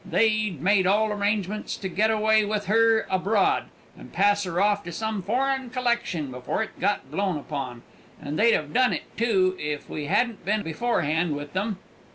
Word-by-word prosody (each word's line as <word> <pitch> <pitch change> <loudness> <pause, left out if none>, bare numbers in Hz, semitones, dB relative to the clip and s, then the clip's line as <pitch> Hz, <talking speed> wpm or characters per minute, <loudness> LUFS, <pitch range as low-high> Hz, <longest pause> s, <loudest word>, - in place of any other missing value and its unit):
They'd 215 -1 +1
made 190 +3 +3
all 210 +2 +3
arrangements 205 0 -2
to 190 - -4
get 200 +5 +1
away 220 0 +3
with 210 0 -2
her 225 +2 +3
abroad, 195 +2 +1 0.3
and - - -13
pass 205 0 +2
her 175 -1 -2
off 205 0 +2
on - - -4
some 220 +2 -3
foreign 260 +5 -1
collection 235 - -1
before 125 - -2
it - - -11
got 200 +2 -1
blown 195 -5 -1
upon; 140 -5 -6 0.4
and 150 +1 -5
they'd 230 +2 +5
have 150 -1 -1
done 255 0 +3
it - - -7
too 190 -5 +2
if 150 -1 -4
we 150 - -4
hadn't 220 +5 0
been 210 +3 0
beforehand 160 -4 0
with 145 0 -7
them! 205 +1 -2
205 Hz, 180 wpm, -25 LUFS, 175-220 Hz, 0.4 s, they'd